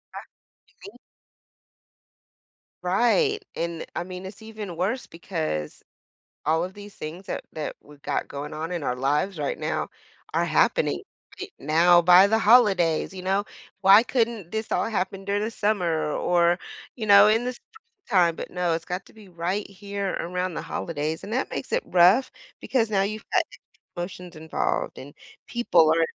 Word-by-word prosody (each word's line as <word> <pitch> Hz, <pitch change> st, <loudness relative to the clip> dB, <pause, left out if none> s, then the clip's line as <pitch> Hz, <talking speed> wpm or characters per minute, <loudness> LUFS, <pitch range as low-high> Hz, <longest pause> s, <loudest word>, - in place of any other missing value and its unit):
Ah -, -, -4 dB, 0.5 s
you -, -, -31 dB
mean 405 Hz, -, -13 dB, 1.9 s
Right, 410 Hz, -, +2 dB
and, 170 Hz, -1 st, -3 dB
I 170 Hz, -, -2 dB
mean, 185 Hz, +1 st, -8 dB
it's 195 Hz, +3 st, -10 dB
even 215 Hz, -5 st, -8 dB
worse 210 Hz, +9 st, -1 dB
because 160 Hz, -, -4 dB, 0.6 s
all 160 Hz, +2 st, +2 dB
of 185 Hz, +1 st, -5 dB
these 205 Hz, 0 st, -12 dB
things 165 Hz, +5 st, -7 dB
that -, -, -4 dB
that 155 Hz, -1 st, -4 dB
we've 145 Hz, -1 st, -17 dB
got -, -, -2 dB
going 145 Hz, +2 st, -6 dB
on 160 Hz, +3 st, -4 dB
in 175 Hz, -2 st, -2 dB
our 125 Hz, -3 st, -1 dB
lives 145 Hz, +8 st, 0 dB
right 145 Hz, -2 st, -2 dB
now -, -, -2 dB, 0.4 s
are -, -, +2 dB
happening -, -, +2 dB, 0.4 s
e -, -, -5 dB
now 170 Hz, +4 st, +5 dB
by 180 Hz, +3 st, +7 dB
the 220 Hz, +2 st, +2 dB
holidays, 195 Hz, -8 st, +4 dB
you 185 Hz, -, -7 dB
know? 195 Hz, +2 st, 0 dB, 0.4 s
Why 195 Hz, +3 st, +8 dB
couldn't 230 Hz, -7 st, -1 dB
this 220 Hz, 0 st, -4 dB
all -, -, +1 dB
happen 195 Hz, -2 st, -2 dB
during 200 Hz, +1 st, 0 dB
the 220 Hz, -, -2 dB
summer 175 Hz, -8 st, 0 dB
or, 175 Hz, +2 st, +2 dB, 0.4 s
you 225 Hz, -, -4 dB
know, 200 Hz, 0 st, +8 dB
in 225 Hz, +3 st, +3 dB
the 250 Hz, -, -2 dB
spring -, -, -19 dB, 0.4 s
time? 175 Hz, -6 st, +4 dB
But, -, -, -7 dB
no, 180 Hz, -2 st, 0 dB
it's 165 Hz, +1 st, -3 dB
got 180 Hz, +1 st, -4 dB
to -, -, -19 dB
be 215 Hz, -3 st, -15 dB
right 180 Hz, +4 st, -3 dB
here 200 Hz, 0 st, -4 dB
around 180 Hz, 0 st, -3 dB
the -, -, -3 dB
holidays. 155 Hz, 0 st, -4 dB
And 205 Hz, -, -7 dB
that 260 Hz, -, -1 dB
makes -, -, -5 dB
it -, -, +1 dB
rough 185 Hz, +9 st, +5 dB, 0.3 s
because 230 Hz, -4 st, 0 dB
now 195 Hz, -2 st, +2 dB
you've 215 Hz, +2 st, -4 dB
got -, -, +4 dB, 0.5 s
promotions 175 Hz, -1 st, -7 dB
involved, 160 Hz, 0 st, -2 dB
and 140 Hz, +2 st, -10 dB, 0.3 s
people 175 Hz, -10 st, +3 dB
are 165 Hz, 0 st, +3 dB
185 Hz, 170 wpm, -25 LUFS, 165-210 Hz, 1.9 s, Why